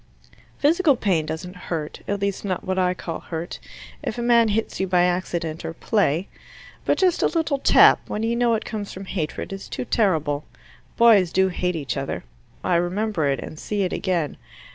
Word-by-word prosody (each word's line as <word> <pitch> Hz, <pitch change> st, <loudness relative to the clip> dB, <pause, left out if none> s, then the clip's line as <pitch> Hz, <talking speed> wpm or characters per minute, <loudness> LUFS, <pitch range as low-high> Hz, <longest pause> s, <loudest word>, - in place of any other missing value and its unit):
"Physical 315 Hz, 0 st, +4 dB
pain 180 Hz, -9 st, 0 dB
doesn't 170 Hz, +4 st, -5 dB
hurt 155 Hz, -3 st, -3 dB
at 200 Hz, 0 st, -1 dB
least 200 Hz, -1 st, -2 dB
not 190 Hz, -3 st, -2 dB
what 185 Hz, 0 st, -1 dB
I 180 Hz, 0 st, +2 dB
call 165 Hz, -2 st, -5 dB
hurt 165 Hz, 0 st, -6 dB, 0.4 s
if 220 Hz, -, -4 dB
a 240 Hz, -, -2 dB
man 235 Hz, -1 st, +5 dB
hits 220 Hz, +1 st, -1 dB
you 190 Hz, -, 0 dB
by 180 Hz, -1 st, +3 dB
accident 175 Hz, -3 st, -1 dB
or 165 Hz, -, -4 dB
play. 190 Hz, -5 st, +1 dB, 0.6 s
But -, -, +2 dB
just 365 Hz, -2 st, +2 dB
a -, -, +4 dB
little 320 Hz, -4 st, 0 dB
tap, -, -, +6 dB
when 215 Hz, -, -2 dB
you 230 Hz, +1 st, +1 dB
know 235 Hz, -1 st, +3 dB
it 220 Hz, -, -4 dB
comes 210 Hz, -3 st, -5 dB
from 190 Hz, +1 st, -8 dB
hatred, 180 Hz, 0 st, -4 dB
is 195 Hz, -, -8 dB
too -, -, -4 dB
terrible. 155 Hz, -11 st, +1 dB, 0.5 s
Boys 210 Hz, -7 st, +6 dB
do 190 Hz, +1 st, +3 dB
hate 180 Hz, 0 st, -1 dB
each 145 Hz, -4 st, -3 dB
other: -, -, -3 dB, 0.4 s
I 180 Hz, -2 st, +2 dB
remember 180 Hz, -1 st, 0 dB
it, 135 Hz, -2 st, 0 dB
and 155 Hz, -, -8 dB
see 205 Hz, -2 st, -1 dB
it 185 Hz, -, -1 dB
again. 170 Hz, -6 st, -1 dB
190 Hz, 190 wpm, -23 LUFS, 170-220 Hz, 0.6 s, tap